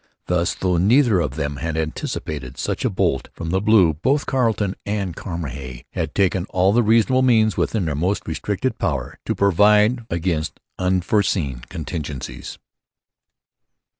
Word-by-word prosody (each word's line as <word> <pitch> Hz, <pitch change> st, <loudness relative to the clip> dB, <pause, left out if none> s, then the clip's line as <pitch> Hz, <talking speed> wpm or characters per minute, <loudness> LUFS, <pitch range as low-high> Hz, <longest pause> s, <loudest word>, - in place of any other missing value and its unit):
Thus, 90 Hz, 0 st, 0 dB
though 90 Hz, -2 st, 0 dB
neither 110 Hz, +3 st, +4 dB
of 75 Hz, -6 st, -2 dB
them 75 Hz, -2 st, -3 dB
had 80 Hz, +3 st, -3 dB
anticipated 75 Hz, -3 st, -4 dB
such -, -, -2 dB
a -, -, +2 dB
bolt 65 Hz, -1 st, 0 dB
from 85 Hz, -1 st, -5 dB
the 95 Hz, +1 st, +1 dB
blue, 105 Hz, -6 st, +5 dB
both 135 Hz, -, 0 dB
Carleton 110 Hz, -7 st, 0 dB
and 100 Hz, -4 st, -3 dB
Cramahe 70 Hz, -8 st, -6 dB
had 75 Hz, -, -3 dB
taken 95 Hz, -2 st, +1 dB
all 95 Hz, +2 st, +2 dB
the 120 Hz, -, +4 dB
reasonable 115 Hz, +4 st, +3 dB
means 110 Hz, -4 st, +3 dB
within 105 Hz, -6 st, 0 dB
their 80 Hz, -, -1 dB
most 90 Hz, +8 st, -1 dB
restricted -, -, -2 dB
power -, -, -2 dB
to -, -, 0 dB
provide 105 Hz, +5 st, +4 dB
against 85 Hz, -2 st, -2 dB, 0.2 s
unforeseen 90 Hz, -, +1 dB
contingencies. 75 Hz, -4 st, -6 dB
90 Hz, 140 wpm, -21 LUFS, 80-105 Hz, 0.2 s, blue